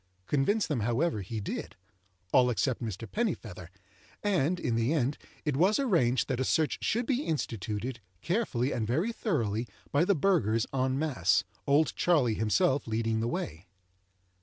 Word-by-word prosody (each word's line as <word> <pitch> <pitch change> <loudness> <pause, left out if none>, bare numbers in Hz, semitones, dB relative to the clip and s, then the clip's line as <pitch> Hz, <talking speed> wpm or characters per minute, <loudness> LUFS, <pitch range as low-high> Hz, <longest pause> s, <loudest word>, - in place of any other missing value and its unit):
Convince 180 - +1
them, 145 -5 -1
however, 120 +3 0
he 110 +4 -5
did—all 95 +3 -2
except 120 +3 0
Mr. 110 -1 -5
Pennifeather, 115 - -3 0.6
and, 180 -4 +1
in 120 - -1
the 115 +3 +1
end, 140 -2 +1 0.3
it 150 -3 0
was 185 +9 +4
arranged 165 - +2
that 130 -3 -1
a - - +2
search 155 +3 +1
should 235 +2 +1
be 265 0 +1
instituted, 120 - -3 0.2
carefully 150 - 0
and 110 -2 -1
very 160 - +1
thoroughly, 120 - -1 0.2
by 145 +3 +3
the 200 +2 +3
burghers 130 - +2
en 130 0 +1
masse, 130 - +2 0.2
"Old 145 +3 +3
Charley" 145 -10 +3
himself 130 - +1
leading 110 0 0
the 115 - 0
way. 85 -7 -4
130 Hz, 150 wpm, -29 LUFS, 110-165 Hz, 0.6 s, was